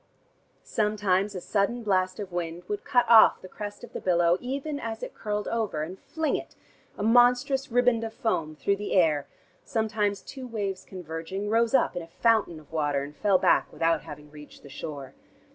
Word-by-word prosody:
Sometimes 205 -2 0
a 180 - -4
sudden 225 +6 0
blast 185 -2 +1
of 200 -3 -6
wind 175 0 -4
would 205 -1 -3
cut 250 -4 +3
off 225 -2 +7
the 185 - -11
crest 205 +3 -8
of 245 - -11
the - - -5
billow 175 -1 +3
even 280 +3 -3
as 225 -2 -5
it - - -6
curled 210 -1 -3
over, 215 -10 -1
and 180 +4 -7
fling 320 -1 -2
it, - - -6 0.4
a 205 - -3
monstrous 245 +4 +3
riband 245 -1 +3
of 225 - -4
foam, 180 - -2
through 200 +5 0
the 205 0 -4
air, 155 -6 +3 0.4
sometimes 215 -3 -1
two 265 -2 -8
waves 200 -5 -4
converging 180 +3 -5
rose 230 +2 +3
up 255 - +2
in 175 - -2
a 165 - -10
fountain 200 -2 +1
of 150 - -19
water, 145 -3 0
and 145 +1 -9
fell 200 +1 +3
back - - +3
without 165 0 +1
having 150 -2 -11
reached 150 -1 -13
the 140 - -12
shore. 140 -1 -7
200 Hz, 190 wpm, -27 LUFS, 165-230 Hz, 0.4 s, off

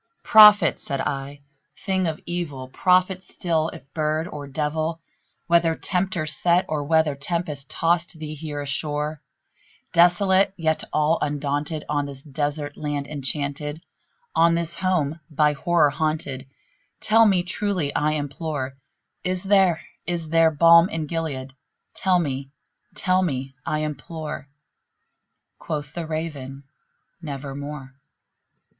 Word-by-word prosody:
"Prophet!" 210 -1 +7
said 140 -2 -3
I, 140 +1 -4 0.4
"thing 190 -2 0
of 160 -1 -3
evil! 155 -7 -4
prophet 185 +4 +2
still, 165 -4 -1
if 135 +2 -13
bird 155 +1 0
or 145 -4 -7
devil! 155 +3 -2 0.5
Whether 170 -1 +3
Tempter 180 -3 -1
sent, 170 +3 +2
or 150 -2 -2
whether 160 -1 +3
tempest 150 -1 -3
tossed 170 0 0
thee 155 -1 -6
here 150 -1 -5
ashore, 150 +1 -2 0.7
Desolate 190 +3 +4
yet 160 -2 0
all 155 +2 +2
undaunted, 145 +1 -2
on 145 -1 -1
this 135 -1 -8
desert 145 0 -3
land 145 -2 -3
enchanted 145 +1 -3 0.5
On 170 0 +4
this 170 0 -1
home 170 -5 0
by 150 -1 +2
Horror 155 -1 +2
haunted 155 -4 -2 0.5
tell 225 +1 +5
me 185 -3 +3
truly, 180 -5 -2
I 150 +1 +1
implore 145 -2 -4 0.5
Is 185 -1 -1
there 190 -4 +3 0.3
is 170 -3 -2
there 165 0 +5
balm 170 +3 +6
in 165 -6 -3
Gilead? 145 -5 -4 0.4
tell 185 -1 +2
me 140 -5 -2 0.5
tell 185 0 +2
me, 135 -6 -2
I 155 0 0
implore!" 155 -1 -6 1.1
Quoth 150 -3 -5
the 170 -2 -5
Raven, 145 -4 -5 0.6
"Nevermore." 140 -2 -6
155 Hz, 125 wpm, -24 LUFS, 145-170 Hz, 1.1 s, Prophet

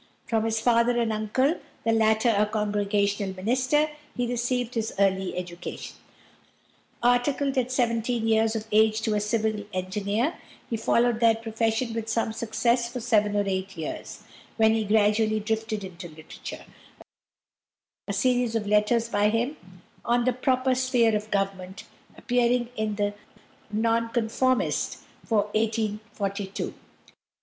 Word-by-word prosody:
From 225 -1 0
his 225 0 0
father 240 +1 +3
and 225 -2 +1
uncle, 255 +9 +1 0.3
the 225 - +3
latter 220 +1 +3
a 210 +1 +3
Congregational 205 -2 0
minister, 255 +9 +1 0.3
he 245 - +1
received 245 0 -1
his 225 -1 -1
early 190 -2 +1
education. 175 -1 -6 1.1
Articled 265 +3 +2
at 255 -1 0
seventeen 235 -2 0
years 220 0 +3
of 220 -1 -3
age 220 +1 +4
to 220 - +1
a 210 - +2
civil 215 0 -1
engineer, 200 - -1 0.4
he - - +1
followed 235 +1 +2
that 225 -1 +3
profession 225 +1 -1
with 225 -1 -4
some 225 0 0
success 235 +2 0
for 250 - -4
seven 210 -3 +2
or 205 - +2
eight 190 -1 -3
years, 160 - -6 0.3
when 220 -1 +5
he 220 -1 0
gradually 215 +1 +3
drifted 220 -1 -2
into 180 -1 -8
literature 160 -1 -10 1.4
a 200 - -2
series 245 +2 +1
of 220 -2 0
letters 210 +3 +2
by 205 -2 +2
him 240 +7 0 0.5
"On 240 0 +1
the 255 - +2
Proper 255 +1 +1
Sphere 250 -3 +2
of 210 +1 -3
Government" 195 -1 -2 0.3
appearing 245 -1 +1
in 215 -2 -1
the 205 0 0 0.6
Nonconformist 230 +3 0 0.3
for 215 -3 +2
1842. 215 -2 -2
220 Hz, 135 wpm, -26 LUFS, 210-240 Hz, 1.4 s, when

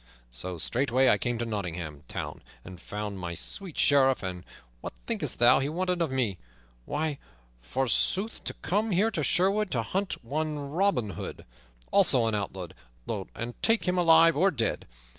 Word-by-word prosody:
So 90 +9 -5
straightway 130 - +2
I - - +4
came 120 -1 -1
to 120 - -2
Nottingham 90 -9 -4
Town - - -6 0.2
and 90 -1 -10
found 105 -1 -5
my 85 -1 -5
sweet 185 - -3
Sheriff; 135 -4 +4
and 90 -1 -5 0.4
what - - -7
thinkest - - -2
thou 120 +2 +6
he 135 +1 -1
wanted 180 +2 -1
of 165 - +1
me? 120 -8 -1 0.5
Why, 150 -1 -2 0.4
forsooth, 135 - 0
to - - -4
come 210 +4 0
here 205 +4 +2
to 160 -7 -2
Sherwood 195 +7 +2
to 120 -7 -1
hunt 195 - -2
up - - -23
one 150 +5 -2
Robin 165 - +1
Hood, - - -7 0.5
also 120 -3 +6
an 110 - 0
outlaw, 95 -4 -3 0.7
and 120 +1 -5
to - - -34
take 225 0 +3
him 180 0 +2
alive 165 -1 +6
or 185 +7 +4
dead. 115 -10 -1
130 Hz, 170 wpm, -28 LUFS, -, 0.7 s, thou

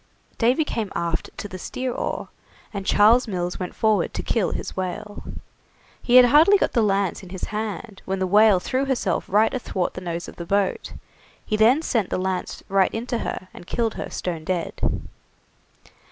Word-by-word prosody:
Davy 250 +7 +3
came 225 -8 -3
aft 170 -1 -2
to 205 - -5
the 185 -2 -8
steer 255 +7 -3
oar, - - -3 0.4
and 195 -1 -5
Charles 230 +4 +5
Mills 180 -3 -3
went 180 - -5
forward 215 -5 +1
to - - -3
kill 220 -6 +1
his - - -5
whale. 205 +3 -4 0.8
He 245 - +2
had 250 0 +10
hardly 310 +10 +6
got - - 0
the 235 - +2
lance 200 -3 +1
in 185 - -12
his 185 0 -8
hand 215 -1 -4
when 195 - -2
the 190 - 0
whale 205 +1 +5
threw 260 +8 -1
herself 240 -9 -1
right 215 +3 +3
athwart 195 -8 -2
the 185 - -7
nose 170 -1 -4
of - - -11
the 170 - -6
boat. 200 0 0 0.5
He 215 - -1
then 240 +9 +4
sent 225 - 0
the - - -1
lance 185 0 -3
right 195 -1 +3
into 235 +1 -3
her 185 - -5
and 175 - -12
killed 230 -2 0
her - - -5
stone 170 -3 -4
dead. 175 0 -3
205 Hz, 185 wpm, -23 LUFS, 185-230 Hz, 0.8 s, had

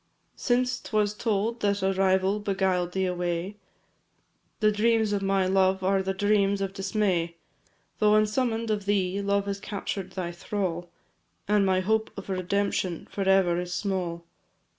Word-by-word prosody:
Since 250 0 0
'twas 210 -1 0
told 220 +1 -1
that 200 -1 0
a 190 0 +2
rival 190 +1 +2
beguil'd 190 -3 0
thee 190 0 0
away, 180 +2 -2 1.0
The 215 -1 +4
dreams 220 0 +2
of 200 - 0
my 195 -1 +1
love 190 0 +2
are 195 +1 +2
the 190 0 -1
dreams 200 0 +2
of 195 -1 -3
dismay; 190 -4 0 0.6
Though 210 0 +4
unsummon'd 225 +1 +1
of 205 -2 -2
thee, 195 -1 +1
love 200 0 +1
has 200 0 -3
captured 195 -2 -5
thy 180 -2 -3
thrall, 175 -1 -3 0.6
And 205 -1 +3
my 185 0 +2
hope 220 +3 +1
of 195 - -8
redemption 190 -1 -1
for 195 -1 -1
ever 185 -3 +4
is 180 0 -4
small. 180 -3 -2
195 Hz, 150 wpm, -27 LUFS, 185-210 Hz, 1.0 s, The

